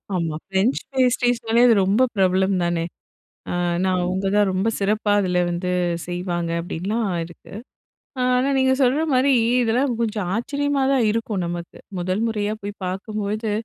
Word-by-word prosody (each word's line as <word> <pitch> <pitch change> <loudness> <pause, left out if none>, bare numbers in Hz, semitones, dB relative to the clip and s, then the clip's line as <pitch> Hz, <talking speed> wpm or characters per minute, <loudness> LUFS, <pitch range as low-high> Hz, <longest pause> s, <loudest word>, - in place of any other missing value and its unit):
ஆமா, 165 -3 -1
ஃப்ரெஞ்ச் 195 +6 +1 0.2
பேஸ்ட்ரீஸ்னாலே 245 -2 +2
அது 235 - +6
ரொம்ப 205 +6 +2
பிரபலம் 190 0 +2
தானே. 170 -1 0 0.7
அ - - -2 0.3
ஏன்னா, 190 - +2
அவங்க 190 +2 -1
தான் 205 -1 +4
ரொம்ப 190 +4 0
சிறப்பா 205 +1 +1
அதுல 180 -2 0
வந்து 175 +1 -2 0.4
செய்வாங்க 175 -1 -3
அப்படின்லாம் 200 +6 -2 0.2
இருக்கு. 170 +3 -13 0.7
ஆனா, 250 +2 +2
நீங்க 260 0 +3
சொல்ற 260 +4 +3
மாரி 260 +2 +3 0.3
இதெல்லாம் 240 +2 +1
கொஞ்சம் 210 -5 -1
ஆச்சரியமா 285 +4 -1
தான் 260 -4 +3
இருக்கும் 220 -3 -2
நமக்கு. 170 0 -6 0.2
முதல் 185 +5 -1
முறையா 210 -2 -1
போய் 205 0 -4
பாக்கும்போது, 210 +3 -3
205 Hz, 140 wpm, -22 LUFS, 185-235 Hz, 0.7 s, அது